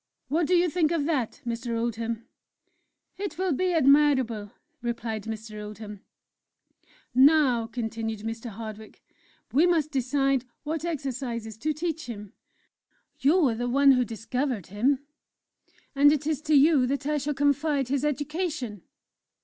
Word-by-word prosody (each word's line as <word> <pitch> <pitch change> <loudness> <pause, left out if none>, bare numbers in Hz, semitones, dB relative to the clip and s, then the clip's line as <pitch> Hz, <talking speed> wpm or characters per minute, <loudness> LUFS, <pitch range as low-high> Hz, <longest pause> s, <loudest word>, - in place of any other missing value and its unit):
What 315 +3 +1
do 365 - +3
you 350 0 +4
think 330 -2 +1
of 325 -4 0
that, 285 -8 -1
Mr. 235 0 -3
Oldham?" 230 0 -3 0.9
"It 400 -4 -4
will 375 0 0
be 365 +6 +1
admirable," 265 -8 +3 0.3
replied 235 -2 -3
Mr. 215 -1 -6
Oldham. 210 0 -8 1.1
"Now," 260 -3 +5
continued 225 -2 -4
Mr. 225 +2 -5
Hardwick, 215 0 -9 0.5
"we 315 +6 +5
must 320 -4 +1
decide 270 0 +1 0.2
what 315 0 -3
exercises 250 -8 -4
to 305 +7 -1
teach 320 -1 -3
him. 210 -4 -8 0.9
You 310 +3 +4
are 235 - +1
the 245 +2 -2
one 275 +2 +5
who 250 -1 +4
discovered 235 - -3
him, 265 +6 +1 0.9
and 290 +1 +6
it 295 -1 0
is 305 -2 -1
to 305 - +5
you 280 -2 +5
that 280 +2 -2
I 300 0 +1
shall 290 +1 -2
confide 285 -1 +1
his 275 0 0
education." 295 - -2
265 Hz, 140 wpm, -27 LUFS, 230-300 Hz, 1.1 s, and